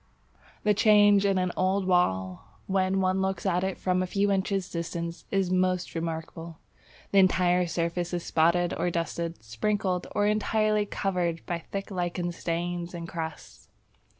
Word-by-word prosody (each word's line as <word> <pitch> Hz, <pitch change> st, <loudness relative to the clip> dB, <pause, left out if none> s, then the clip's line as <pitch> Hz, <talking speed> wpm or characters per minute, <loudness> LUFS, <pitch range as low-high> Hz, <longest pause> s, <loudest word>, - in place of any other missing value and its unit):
The 210 Hz, -, +4 dB
change 205 Hz, -1 st, +5 dB
in 195 Hz, -1 st, +2 dB
an 185 Hz, -1 st, 0 dB
old 190 Hz, +1 st, +1 dB
wall 95 Hz, -, 0 dB
when 190 Hz, 0 st, +1 dB
one 185 Hz, 0 st, +1 dB
looks 190 Hz, -1 st, -2 dB
at 180 Hz, -1 st, +1 dB
it 190 Hz, 0 st, -2 dB
from 185 Hz, 0 st, 0 dB
a 185 Hz, -, -1 dB
few 200 Hz, +2 st, +1 dB
inches 195 Hz, -1 st, 0 dB
distance 170 Hz, -1 st, -5 dB
is 195 Hz, -2 st, 0 dB
most 185 Hz, -1 st, +1 dB
remarkable. 165 Hz, 0 st, -5 dB, 0.5 s
The 200 Hz, -, +5 dB
entire 180 Hz, -1 st, +3 dB
surface 170 Hz, +1 st, -2 dB
is 175 Hz, -1 st, -3 dB
spotted 170 Hz, +2 st, +2 dB
or 180 Hz, -, 0 dB
dusted, 170 Hz, -3 st, -3 dB
sprinkled 180 Hz, -, -1 dB
or 205 Hz, -, +2 dB
entirely 215 Hz, 0 st, +1 dB
covered 175 Hz, -5 st, -2 dB
by 170 Hz, -1 st, -2 dB
thick 195 Hz, +4 st, -6 dB
lichen 175 Hz, -1 st, -2 dB
stains 175 Hz, +1 st, -3 dB
and 170 Hz, -1 st, -6 dB
crusts. 160 Hz, -2 st, -7 dB
180 Hz, 150 wpm, -27 LUFS, 170-195 Hz, 0.5 s, change